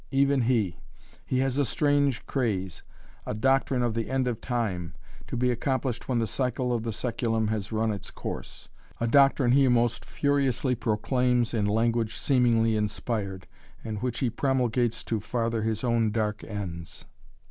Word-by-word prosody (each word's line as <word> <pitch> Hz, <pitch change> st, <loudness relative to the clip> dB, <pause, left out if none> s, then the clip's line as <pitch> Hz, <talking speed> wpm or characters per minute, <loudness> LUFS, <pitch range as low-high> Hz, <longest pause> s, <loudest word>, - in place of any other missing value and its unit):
"Even 140 Hz, 0 st, +3 dB
he! 115 Hz, -, +1 dB, 0.5 s
He 130 Hz, -, 0 dB
has 135 Hz, +1 st, 0 dB
a -, -, +4 dB
strange 145 Hz, 0 st, +1 dB
craze, 100 Hz, -9 st, -2 dB, 0.4 s
a -, -, -4 dB
doctrine 135 Hz, +2 st, +2 dB
of 120 Hz, -2 st, 0 dB
the 115 Hz, 0 st, -2 dB
End 130 Hz, -1 st, +1 dB
of 120 Hz, -3 st, -2 dB
Time, 95 Hz, -, -2 dB, 0.3 s
to -, -, -4 dB
be 125 Hz, +1 st, +2 dB
accomplished 130 Hz, 0 st, -2 dB
when 125 Hz, -, +1 dB
the 115 Hz, -, +2 dB
cycle 125 Hz, +1 st, -1 dB
of 120 Hz, -, 0 dB
the 115 Hz, -, -3 dB
sæculum 115 Hz, -1 st, -1 dB
has 110 Hz, -1 st, -3 dB
run 110 Hz, 0 st, +1 dB
its 100 Hz, -3 st, -5 dB
course. -, -, -7 dB, 0.3 s
A 115 Hz, -, 0 dB
doctrine 135 Hz, 0 st, +4 dB
he 135 Hz, +1 st, +5 dB
most 120 Hz, -1 st, +2 dB
furiously 140 Hz, -3 st, +1 dB
proclaims 125 Hz, +1 st, +1 dB
in 105 Hz, -3 st, +1 dB
language 115 Hz, +1 st, +1 dB
seemingly 115 Hz, -4 st, +3 dB
inspired, 105 Hz, -2 st, -2 dB, 0.4 s
and 110 Hz, -2 st, -4 dB
which 125 Hz, -2 st, -2 dB
he 125 Hz, -3 st, +1 dB
promulgates 120 Hz, -2 st, +1 dB
to 110 Hz, -, -1 dB
farther 115 Hz, +1 st, -1 dB
his 110 Hz, 0 st, -1 dB
own 115 Hz, -2 st, +2 dB
dark 105 Hz, -1 st, -1 dB
ends." 90 Hz, -6 st, -5 dB
120 Hz, 160 wpm, -27 LUFS, 110-130 Hz, 0.5 s, he